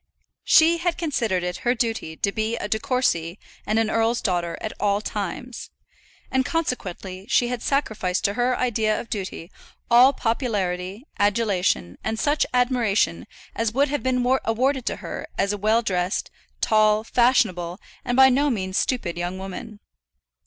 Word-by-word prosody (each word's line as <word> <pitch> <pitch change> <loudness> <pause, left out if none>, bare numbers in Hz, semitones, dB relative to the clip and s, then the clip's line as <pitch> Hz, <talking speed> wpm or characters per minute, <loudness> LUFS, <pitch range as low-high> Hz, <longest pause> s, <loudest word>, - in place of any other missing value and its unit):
She 335 +1 +5
had 345 -1 -1
considered 230 - -1
it 180 0 -3
her 245 +1 0
duty 225 -9 -2
to 200 - 0
be 220 +2 -1
a 205 - -4
De 220 +1 0
Courcy 215 - 0 0.3
and 215 +1 +1
an 225 -1 +1
earl's 225 +1 +1
daughter 175 -3 -1
at 220 - -5
all 200 -1 +2
times; 215 +4 -5 0.6
and 260 0 +2
consequently 200 - -4
she 245 -2 +3
had 245 -2 -3
sacrificed 215 -10 -1
to 200 - +1
her 245 +2 +1
idea 220 -3 +1
of 230 - -9
duty 190 -3 -5 0.4
all 245 +3 +8
popularity, 210 -5 -2
adulation, 200 - +1
and 220 0 -2
such 295 +1 +1
admiration 230 - +1 0.3
as 225 -1 -1
would 280 +1 +3
have 290 0 -1
been 250 -1 0 0.2
awarded 255 +3 0
to - - 0
her - - -6
as 200 +1 +1
a - - -3
well 220 +3 +2
dressed, 180 -3 -1 0.3
tall, 215 0 +3
fashionable, 215 -8 +2 0.2
and 245 - -1
by 265 0 +8
no 280 +3 +2
means 190 -6 -1
stupid 180 -10 -1
young 175 +2 -3
woman. 205 +3 -8
220 Hz, 160 wpm, -23 LUFS, 190-250 Hz, 0.6 s, all